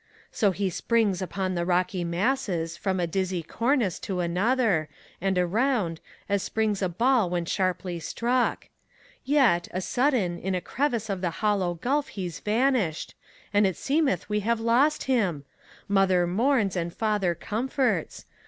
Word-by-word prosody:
So 210 - +2
he 190 0 -1
springs 210 -1 +1
upon 185 0 -2
the 175 -1 -1
rocky 180 +1 0
masses, 175 -2 -1
from 190 +1 -2
a 175 - +1
dizzy 185 0 -2
cornice 230 - 0
To 190 -2 -4
another, 180 -1 +1 0.3
and 190 0 0
around, 185 -2 +1 0.3
as 200 -1 +1
springs 210 -1 -1
a 185 - +1
ball 235 +2 +2
when 175 -1 -1
sharply 185 -1 -1
struck. 240 +9 -1 0.5
Yet, 260 -12 +3
a 185 - -3
sudden, 215 -5 0
in 190 0 -2
a - - 0
crevice 235 +1 -1
of 195 -3 -3
the 180 - 0 0.2
hollow 190 -4 +1
gulf 275 - 0
he's 180 -4 -6
van 245 +6 +2
ished, 175 -11 -2 0.4
And 205 0 +4
it 190 - -3
seemeth 280 - 0
we 210 0 0
have 230 +2 0
lost 250 +7 +2
him 190 - 0
I - - -27
Mother 190 -2 +4
mourns^ 210 +2 +1
and 170 -1 -2
father 205 -3 0
comforts. 225 - -1
195 Hz, 155 wpm, -26 LUFS, 175-235 Hz, 0.5 s, And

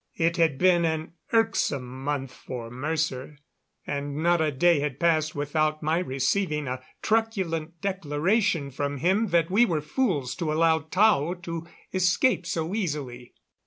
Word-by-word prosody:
It 170 +1 +1
had 160 -5 +2
been 175 +1 +4
an 160 0 -2 0.2
irksome 140 - 0
month 135 -2 -2
for 120 -3 -7
Mercer, 145 +1 -3 0.5
and 140 0 -3
not 170 +2 +2
a 155 -1 +1
day 170 +3 +3
had 140 -2 -3
passed 155 -2 +2
without 155 +1 0
my 160 +3 +1
receiving 150 0 -1
a 130 0 -4 0.2
truculent 185 -8 -1
declaration 180 -2 0
from 145 +2 -3
him 190 - +2
that 170 -1 +1
we 210 +5 +5
were 170 -10 +1
fools 150 - -1
to 165 -4 -1
allow 160 +1 +3
Tao 175 0 +2
to 165 -1 -5 0.3
escape 185 +2 +2
so 165 +1 -2
easily. 140 - -4
160 Hz, 145 wpm, -26 LUFS, 145-180 Hz, 0.5 s, we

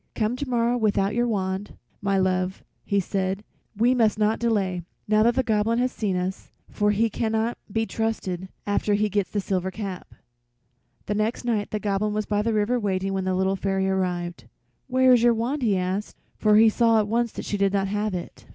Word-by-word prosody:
"Come 220 +1 0
tomorrow 245 -2 0
without 205 -3 +1
your 240 +1 +1
wand, 195 -2 -2 0.3
my 200 -1 +1
love," 185 0 0 0.2
he 200 - +1
said; 190 +1 -2 0.3
"we 240 +4 +4
must 225 -4 +2
not 215 +1 +1
delay, 200 -6 0 0.3
now 215 0 +4
that 235 +2 +3
the 260 - +2
Goblin 220 0 +1
has 250 +1 +1
seen 205 -6 -2
us, 185 +1 -3 0.2
for 210 0 +1
he 210 +2 +2
cannot 225 +1 -1 0.2
be 225 +2 0
trusted 190 -5 -3 0.2
after 205 0 +1
he 210 +1 +1
gets 205 -1 0
the 205 - -2
silver 190 -1 -1
cap." 190 -2 -7 0.9
The 210 - -1
next 215 +4 -1
night 215 -4 0
the 215 - -2
Goblin 210 +1 -1
was 215 0 -1
by 205 -1 0
the 230 +2 0
river 220 +3 +1
waiting 195 -2 -1
when 190 -1 -1
the 185 0 0
Little 190 +1 +1
Fairy 195 0 0
arrived. 180 -2 -2 0.4
"Where 260 0 +5
is 245 - +5
your 240 -1 +4
wand?" 250 +6 -1
he 210 -6 +2
asked, 185 +3 -3 0.2
for 210 -1 +3
he 220 +1 +7
saw 230 +1 +3
at 210 -1 +2
once 235 +1 0
she 205 - -2
did 200 -1 +2
not 195 -1 +1
have 210 0 -1
it. 175 - -8
210 Hz, 200 wpm, -25 LUFS, 190-225 Hz, 0.9 s, he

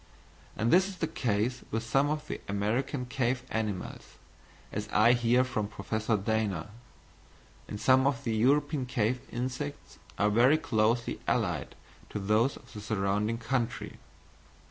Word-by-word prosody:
And 115 +2 +1
this 185 +2 +6
is 195 - -7
the 165 - 0
case 120 -2 -1
with 115 +1 -2
some 135 +5 +2
of 150 0 -2
the - - -5
American 120 +7 -1
cave 125 -1 -1
animals, 105 -4 -4 0.6
as 105 +1 -4
I 115 +3 +6
hear 120 +1 +3
from 125 -5 -2
Professor 110 +2 -1
Dana; 105 -2 -1 1.0
and 105 - -6
some 130 +3 +5
of 140 -4 -1
the 115 -2 -1
European 140 +3 +2
cave 125 0 0
insects 130 +4 -5 0.2
are 105 +1 +3
very 125 +8 +5
closely 115 -4 +1
allied - - 0 0.3
to - - -4
those 105 +6 +2
of - - -17
the 105 - -7
surrounding 105 +1 0
country. 115 0 -2
115 Hz, 145 wpm, -30 LUFS, 105-130 Hz, 1.0 s, this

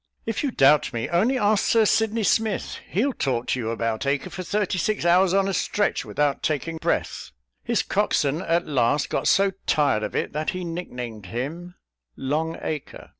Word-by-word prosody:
"If 225 -2 -2
you 285 - 0
doubt 135 - +4
me, 115 -1 -3
only 215 +10 +2
ask 210 -2 +2
Sir 225 -1 +4
Sydney 220 +1 +2
Smith; 220 0 0
he'll 255 +9 +1
talk 125 - -1
to 130 - 0
you 115 -2 -2
about 115 +2 -2
Acre 140 0 -1
for 185 - -5
thirty 190 0 -1
six 210 0 -1
hours 180 +2 +4
on 195 +1 +2
a 195 - -1
stretch, 205 +2 0
without 145 -2 0
taking 160 +2 -2
breath; - - -2 0.3
his - - 0
cockswain 145 +4 +1
at 170 0 0
last 140 0 +1
got - - 0
so 195 0 +4 0.2
tired 140 -8 +2
of - - -4
it, - - -1
that 155 +1 -1
he 185 - -4
nick 170 +1 -5
named 115 -5 -7
him 155 - -5 0.4
'Long 155 +4 -2
Acre.'" 155 -3 -5
165 Hz, 185 wpm, -24 LUFS, 135-195 Hz, 0.4 s, doubt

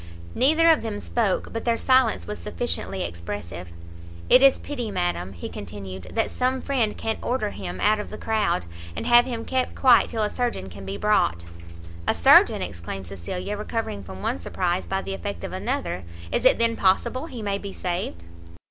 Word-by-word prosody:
Neither 315 +5 +4
of 315 - +3
them 215 -2 -4
spoke, 215 -3 -1
but 225 - -3
their 235 -1 +1
silence 255 -3 +3
was 210 - -5
sufficiently 210 -4 -3
expressive. 85 0 -6 0.6
"It - - +8
is 275 -1 +7
pity, 250 -6 -5
madam," 90 - -2
he 85 - -6
continued, 95 -1 -8
"that 225 - +1
some 255 +1 0
friend 250 -6 0
can't 225 0 -2
order 240 -4 -1
him 95 -2 -6
out 215 0 +3
of 210 - -5
the - - -7
crowd, 220 - 0 0.3
and - - -4
have 240 0 +7
him 235 -3 -4
kept 260 -1 -1
quiet 255 -3 +5
till 225 -2 -1
a 210 - +1
surgeon 235 - -2
can 95 +2 -10
be 100 +1 -4
brought." 85 - +2 0.6
"A - - +3
surgeon!" - - +6
exclaimed 85 +3 -6
Cecilia, 100 - -5
recovering 210 - -3
from 95 +1 -9
one - - -1
surprize 175 - -1
by 195 0 -1
the 95 - -4
effect 95 -3 -5
of - - -5
another; 90 - -2 0.3
"is - - 0
it - - +6
then 230 0 +2
possible 225 +10 +1
he 245 -8 -7
may 200 -1 -1
be 200 -1 -6
saved?" 175 - -3
205 Hz, 185 wpm, -25 LUFS, -, 0.6 s, It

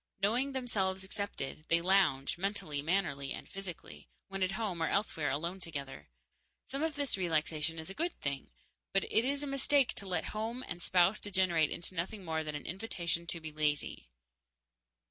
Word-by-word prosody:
Knowing 240 +8 +2
themselves 195 -7 0
accepted, 190 -7 -4
they 170 - +5
lounge 170 -7 +3
mentally, 175 -6 -1
mannerly, 150 -5 0
and - - -7
physically 195 -3 -7 0.2
when 195 0 -4
at 185 +1 +2
home 195 -5 -1
or 160 - +3
elsewhere 165 -8 +1
alone 170 +7 -1
together. 140 - -6 0.6
Some 275 +2 -4
of 320 -2 0
this 285 -6 +1
relaxation 160 -2 +1
is 160 +3 -5
a - - -6
good 335 - -2
thing, 140 -1 -2 0.4
but 195 - +4
it 220 - +3
is 280 +3 +1
a - - -1
mistake 275 -1 +3
to 200 - -6
let 185 - 0
home 225 +4 -2
and 175 - -5
spouse 185 +4 +4
degenerate 185 -6 +3
into 175 - -3
nothing 185 +3 -3
more 160 -1 0
than 150 -1 -3
an 145 - -5
invitation 170 -3 -1
to 170 - -3
be 160 -1 -6
lazy. 150 - 0
185 Hz, 175 wpm, -34 LUFS, 160-210 Hz, 0.6 s, they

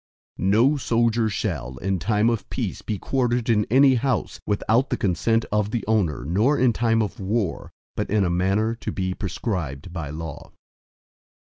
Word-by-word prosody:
III - - -2
No 120 +9 +4
soldier 115 -3 +1
shall, 65 -9 -3
in 95 +5 -1
time 105 +6 +2
of 115 -4 -3
peace - - -3
be 105 - -3
quartered 120 +1 0
in 105 -2 +2
any 135 +3 +6
house, 125 -1 -1
without 110 +5 +1
the - - -1
consent 115 +4 +1
of 105 -1 +1
the 115 +1 -3
owner, 95 - +1
nor 110 - +2
in 125 -2 +3
time 115 -1 +2
of 105 - -5
war, 100 -1 -2 0.2
but - - -2
in 105 -1 +2
a - - 0
manner 95 +6 +1
to 115 - -5
be 95 -1 -2
prescribed 90 - -4
by 85 -5 -4
law. 75 -1 -7
105 Hz, 175 wpm, -24 LUFS, 95-115 Hz, 0.2 s, any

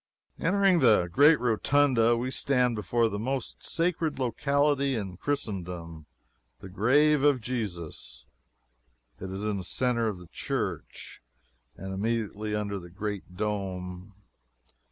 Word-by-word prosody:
Entering 190 0 +3
the 110 - +5
great 145 - +6
Rotunda, 120 0 +3
we 125 +2 -2
stand 125 -3 +1
before 115 +2 +1
the 100 -2 -4
most 130 +3 -3
sacred 165 -2 0
locality 140 +2 +1
in 95 -5 -4
Christendom 90 - -4 0.5
the 95 - -10
grave 140 +10 +3
of 145 -2 +4
Jesus. 105 -10 -5 0.9
It 95 - -6
is 95 +2 -5
in 105 -1 -1
the 95 - -5
centre 120 +3 0
of 105 -4 -2
the 90 - -12
church, - - -5 0.6
and 95 0 -6
immediately 105 0 -2
under 100 -1 -2
the 85 -1 -11
great 100 -1 -6
dome. 95 -2 -4
110 Hz, 125 wpm, -28 LUFS, 95-135 Hz, 0.9 s, great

